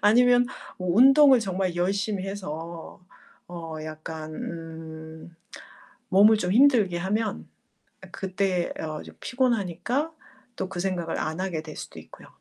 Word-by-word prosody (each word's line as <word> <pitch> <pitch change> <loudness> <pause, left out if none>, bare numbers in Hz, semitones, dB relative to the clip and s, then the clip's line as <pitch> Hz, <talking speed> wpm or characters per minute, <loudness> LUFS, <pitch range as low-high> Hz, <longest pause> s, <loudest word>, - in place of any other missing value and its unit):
아니면 245 +3 +5 0.3
어 185 - -4
운동을 270 +6 +7
정말 190 -3 -2
열심히 195 +2 -1
해서 170 -3 -7 0.5
어 165 -2 -7
약간 155 0 -7
음 160 0 -8 0.7
몸을 210 +3 +6
좀 180 -2 -1
힘들게 230 -8 +5
하면 210 +3 -2 0.7
그때 190 -2 -1
어 155 -1 -4
좀 - - -13
피곤하니까 245 - 0 0.5
또 - - -2
그 185 - -6
생각을 180 -3 -2
안 160 +2 -3
하게 170 -5 -3
될 155 -1 -9
수도 - - -9
있고요. - - -15
185 Hz, 235 characters per minute, -26 LUFS, 165-215 Hz, 0.7 s, 운동을